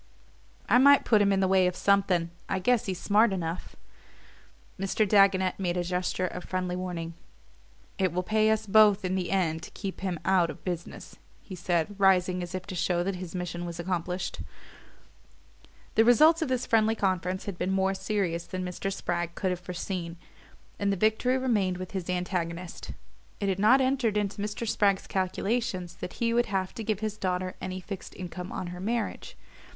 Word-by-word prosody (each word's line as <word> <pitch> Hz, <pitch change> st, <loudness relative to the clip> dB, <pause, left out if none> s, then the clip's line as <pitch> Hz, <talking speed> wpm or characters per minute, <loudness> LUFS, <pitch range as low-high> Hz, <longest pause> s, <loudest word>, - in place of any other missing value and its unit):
"I 245 Hz, -, +5 dB
might 280 Hz, +1 st, +6 dB
put 215 Hz, -3 st, +4 dB
him 200 Hz, -1 st, +3 dB
in 195 Hz, 0 st, +2 dB
the 190 Hz, -, +3 dB
way 190 Hz, -1 st, +4 dB
of 180 Hz, -, -2 dB
something 190 Hz, -4 st, +2 dB, 0.2 s
I 190 Hz, -, 0 dB
guess 225 Hz, +5 st, +1 dB
he's 185 Hz, -2 st, -3 dB
smart 210 Hz, +2 st, +4 dB
enough." 175 Hz, -2 st, -4 dB, 1.0 s
Mr. 195 Hz, +2 st, +1 dB
Dagonet 190 Hz, -2 st, +4 dB
made 180 Hz, -2 st, -1 dB
a 175 Hz, -, 0 dB
gesture 180 Hz, +1 st, -1 dB
of 180 Hz, 0 st, -5 dB
friendly 180 Hz, -1 st, -2 dB
warning. 175 Hz, -2 st, -4 dB, 0.9 s
"It 190 Hz, -2 st, +2 dB
will 180 Hz, +2 st, -1 dB
pay 215 Hz, +2 st, +2 dB
us 220 Hz, 0 st, +1 dB
both 210 Hz, -1 st, +5 dB
in 185 Hz, -, -1 dB
the 185 Hz, -2 st, -1 dB
end 165 Hz, -4 st, 0 dB
to -, -, -9 dB
keep 195 Hz, -3 st, -5 dB
him 185 Hz, -4 st, -2 dB
out 185 Hz, -3 st, +3 dB
of -, -, -9 dB
business," 175 Hz, -2 st, -6 dB, 0.3 s
he 195 Hz, -, -10 dB
said, 175 Hz, +1 st, -1 dB
rising 185 Hz, -2 st, +3 dB
as 175 Hz, +1 st, -5 dB
if 185 Hz, -1 st, -5 dB
to 200 Hz, -, -7 dB
show 175 Hz, 0 st, 0 dB
that 190 Hz, 0 st, -2 dB
his 180 Hz, -1 st, -7 dB
mission 175 Hz, -1 st, -4 dB
was 170 Hz, -1 st, -6 dB
accomplished. 180 Hz, +1 st, -3 dB, 1.5 s
The 225 Hz, -, +5 dB
results 305 Hz, +8 st, +6 dB
of 320 Hz, -, 0 dB
this 255 Hz, -1 st, -1 dB
friendly 220 Hz, 0 st, +3 dB
conference 185 Hz, -2 st, -1 dB
had 195 Hz, -4 st, -6 dB
been 180 Hz, -, -1 dB
more 190 Hz, 0 st, +1 dB
serious 190 Hz, -4 st, -2 dB
than 185 Hz, -1 st, -4 dB
Mr. 180 Hz, +2 st, -3 dB
Spragg 175 Hz, -3 st, -3 dB
could 190 Hz, -2 st, -1 dB
have 180 Hz, -, -3 dB
foreseen 180 Hz, -1 st, -5 dB, 0.6 s
and 200 Hz, 0 st, +1 dB
the 195 Hz, -, -1 dB
victory 220 Hz, +6 st, +2 dB
remained 210 Hz, -8 st, +1 dB
with 185 Hz, -1 st, -7 dB
his 185 Hz, -3 st, -4 dB
antagonist. 180 Hz, -1 st, -3 dB, 0.5 s
It 200 Hz, -, 0 dB
had 190 Hz, 0 st, -1 dB
not 230 Hz, +6 st, +6 dB
entered 260 Hz, -5 st, +1 dB
into 205 Hz, 0 st, -2 dB
Mr. 210 Hz, +3 st, -3 dB
Spragg's 200 Hz, -2 st, +2 dB
calculations 190 Hz, -1 st, -2 dB
that -, -, -6 dB
he 230 Hz, -1 st, 0 dB
would 240 Hz, 0 st, +2 dB
have 190 Hz, -2 st, -2 dB
to 225 Hz, -, -6 dB
give 215 Hz, -1 st, -1 dB
his 215 Hz, -1 st, -3 dB
daughter 185 Hz, -1 st, -2 dB
any 185 Hz, 0 st, -4 dB
fixed 190 Hz, +1 st, -8 dB
income 180 Hz, 0 st, -7 dB
on 180 Hz, -, -4 dB
her 180 Hz, -, -8 dB
marriage. 235 Hz, -, -3 dB
190 Hz, 190 wpm, -28 LUFS, 180-210 Hz, 1.5 s, might